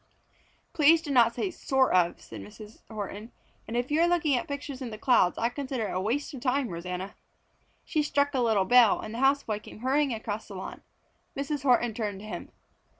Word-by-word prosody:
"Please 320 0 +5
do 290 - -4
not 235 -3 +4
say 385 - -2
'sort 265 -5 +1
of,'" 175 -2 +2
said - - -10
Mrs. 210 0 -12
Horton. 210 +1 -6 0.4
"And 230 - -3
if 245 +3 -2
you 310 +2 +3
are 340 - +5
looking 330 -5 +2
at 245 - -2
pictures 280 -1 -6
in 250 - -4
the 215 - -7
clouds, 215 -6 +3
I 230 - +1
consider 260 -4 -3
it - - -4
a 185 - -1
waste 265 +10 -2
of 260 - -8
time, 260 -1 0
Rosanna!" 180 +3 -5 0.7
She 315 -3 0
struck 285 -1 +1
a 265 - 0
little 220 -5 +2
bell, 245 +1 +6
and 215 - -7
the 235 - -5
house 275 +2 +3
boy 215 -2 -3
came 215 - -13
hurrying 275 +2 +1
across 220 -1 -4
the 200 - -9
lawn. 190 - -7 0.6
Mrs. 285 +1 -2
Horton 240 -3 +3
turned 210 -3 -3
to - - -10
him. 215 - -7
245 Hz, 210 wpm, -28 LUFS, 215-280 Hz, 0.7 s, bell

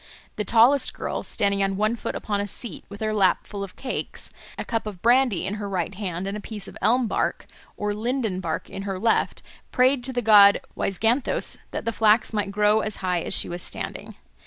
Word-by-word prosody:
The 210 - -2
tallest 240 +6 +4
girl, - - -3
standing 200 -1 0
on 195 0 0
one 215 +3 +1
foot - - -5
upon 205 -1 -2
a 205 - -3
seat, 230 +4 -6
with 200 +1 -10
her 215 0 0
lap 195 -3 +2
full 200 -1 -6
of 195 - -9
cakes, 260 - -5 0.3
a - - -4
cup 225 -2 -2
of 195 -4 -8
brandy 240 -5 +3
in 190 - -2
her 200 - -4
right 185 -1 -2
hand 185 -2 -4
and 195 +1 -3
a - - -4
piece 205 -2 -6
of - - -11
elm 245 +3 +3
bark - - -1 0.3
or 210 0 -1
linden 220 -3 -2
bark - - -3
in 195 - -7
her 195 -1 -3
left, 225 +4 0 0.3
prayed 255 0 +3
to 260 - 0
the 245 -1 -2
god 205 -2 +7 0.2
Waizganthos 225 +7 0
that - - -5
the 230 - -1
flax 220 +1 +3
might 205 -2 -1
grow 210 +2 +3
as 215 -1 -2
high 180 -2 +1
as - - 0
she - - +4
was 175 +1 -5
standing. - - -6
210 Hz, 215 wpm, -24 LUFS, 195-230 Hz, 0.3 s, god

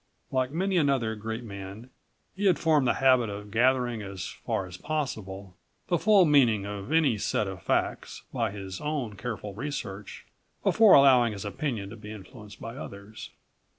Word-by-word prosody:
Like 130 -1 +1
many 185 +5 0
another 135 -8 +2
great 110 +2 -5
man 100 +3 -9 0.4
he 200 +2 -2
had 180 - +4
formed 155 -5 +3
the - - +2
habit 130 -4 +4
of 105 0 -7
gathering, 120 0 +2
as 100 -3 -6
far 95 - -3
as 90 -1 -10
possible, 100 -9 -4 0.3
the 175 -2 +2
full 205 -4 +5
meaning 120 -9 +4
of 100 +4 -6
any 150 -9 +3
set 105 - 0
of 95 -1 -7
facts - - -2
by 115 -4 0
his 95 -2 -7
own 145 -8 -3
careful 105 0 -5
research, 105 -5 -6 0.4
before 220 -3 +6
allowing 125 -5 +6
his 100 0 -7
opinion 100 -1 -3
to 115 - -9
be 105 -1 -9
influenced 105 0 -11
by 115 +1 -7
others. 100 0 -9
115 Hz, 165 wpm, -27 LUFS, 100-140 Hz, 0.4 s, before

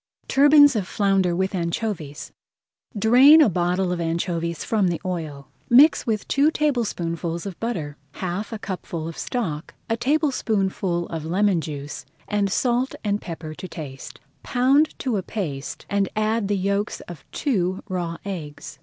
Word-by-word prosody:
TURBANS 290 0 +6
OF 200 -4 -1
FLOUNDER 195 -4 +1
WITH 190 +2 -1
ANCHOVIES 170 -4 -3 0.7
Drain 255 +9 +7
a 300 - +6
bottle 180 +1 0
of 175 -1 -2
anchovies 170 0 -2
from 210 -4 +1
the 170 -1 -1
oil. 155 -6 -5 0.2
Mix 275 +5 +6
with 215 -2 -1
two 285 +3 +3
tablespoonfuls 180 - -1
of 195 -4 -7
butter, 165 -11 -3 0.2
half 185 +4 -4
a 225 - -4
cupful 180 -5 -5
of 165 - -6
stock, 170 - -4 0.2
a - - +3
tablespoonful 220 - 0
of 165 -2 -4
lemon 185 +1 +2
juice, 145 -1 -7 0.2
and 205 -2 0
salt 250 +4 +1
and 205 -1 0
pepper 160 -2 -7
to 185 - -8
season. 135 -5 -8 0.3
Pound 275 +5 +2
to 250 -5 -1
a - - -1
paste, 160 -9 -5
and 200 -1 0
add 215 0 0
the 205 0 0
yolks 200 +2 -1
of 175 -5 -10
two 190 - -1
raw 175 -3 -3
eggs. 160 -7 -7
190 Hz, 150 wpm, -23 LUFS, 170-225 Hz, 0.7 s, Drain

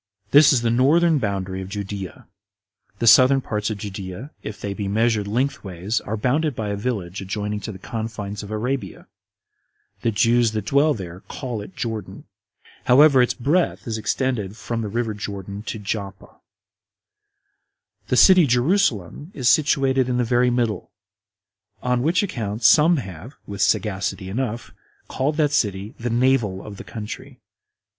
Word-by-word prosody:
This 145 +1 +7
is 125 -4 +2
the 115 - +2
northern 155 +6 +4
boundary 95 -4 -3
of 95 - -7
Judea. 100 -2 -6 0.7
The 115 - -2
southern 130 +4 +7
parts 105 -4 -3
of 110 - -3
Judea, 100 +5 -7
if 105 - -7
they 100 - -4
be 100 0 -4
measured 110 0 +1
lengthways, 105 -4 -2
are 110 +2 -4
bounded 140 +6 0
by 110 -2 -3
a 100 - -1
Village 100 -4 -4
adjoining 105 +2 -3
to 110 - -6
the 95 - -9
confines 110 -1 -5
of 100 - -9
Arabia; 110 -2 -3 1.0
the 115 - +1
Jews 115 +1 +2
that 110 -2 -3
dwell 145 +5 +3
there 90 -4 -8
call 120 -6 -5
it 95 -2 -11
Jordan. 110 -5 -5 0.6
However, 135 +1 +6
its 125 - +1
breadth 155 +8 0
is 110 -2 -3
extended 110 -3 -2
from 115 -1 -4
the 110 - -3
river 115 +1 -2
Jordan 100 -1 -6
to - - -3
Joppa. 100 -2 -6 1.7
The - - +1
city 185 -5 +7
Jerusalem 125 - +1
is 125 -4 +2
situated 135 -4 +2
in 125 - 0
the 125 - +2
very 120 +1 +2
middle; 120 -6 -1 0.9
on 125 -1 +1
which 165 +8 +2
account 115 - -4
some 160 +8 +6
have, 100 - -8
with 100 -1 -6
sagacity 95 -3 0
enough, 115 +1 -3 0.4
called 145 +3 -1
that 150 -3 +2
city 105 -6 -1
the 120 +1 -2
Navel 120 -5 +1
of 105 -2 -9
the - - -8
country. 120 +4 -8
115 Hz, 155 wpm, -22 LUFS, 100-130 Hz, 1.7 s, This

